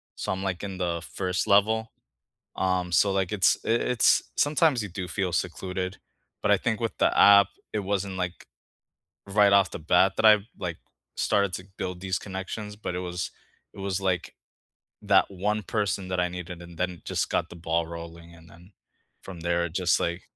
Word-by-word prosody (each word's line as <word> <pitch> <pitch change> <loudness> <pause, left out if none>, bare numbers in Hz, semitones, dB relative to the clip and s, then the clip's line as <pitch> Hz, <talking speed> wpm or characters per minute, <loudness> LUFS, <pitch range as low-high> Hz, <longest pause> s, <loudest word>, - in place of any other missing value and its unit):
So - - -3
I'm, 95 0 -3
like, 95 -3 -2
in 95 -2 -5
the 85 -2 -2
1st 90 -1 -1
level, 110 +3 +3 0.7
um, 90 -1 0
so, 100 +3 +4
like, 95 -2 0
it's 95 -4 +4
i - - -5
it's 120 +1 +3
sometimes 145 -4 +3
you 100 - -5
do 95 0 -5
feel 95 -2 -1
secluded, 90 +2 -3 0.4
but - - +2
I - - +6
think 110 -2 -2
with 115 -1 -3
the - - +2
app, 100 0 +8 0.3
it 105 - -1
wasn't, 100 -1 -2
like, 90 -2 -4 0.8
right 100 0 +4
off 100 -2 +4
the - - -6
bat 90 +4 +3
that - - +1
I've, 105 -1 +6
like, 85 -3 -4 0.4
started 100 -2 +2
to 95 - -8
build 90 -1 -4
these 95 0 -1
connections, 105 +2 -6
but 90 -4 -4
it - - -2
was 90 -1 -4 0.4
it - - -12
was, 95 -1 -2
like, 95 -2 -1 0.7
that 100 -2 +4
one 105 +3 -1
person 100 -2 -2
that 90 -1 0
I 90 - +1
needed 90 -1 -7
and 85 -1 -12
then 90 -2 -2
just - - -1
got 85 - -1
the - - -10
ball 85 0 -1
rolling, 85 0 -9
and 85 0 -17
then 90 +5 -17 0.5
from 90 -3 -9
there, 85 +1 0
it 80 - -10
just, 90 -2 +2
like 85 +1 -2
95 Hz, 190 wpm, -26 LUFS, 90-100 Hz, 0.8 s, app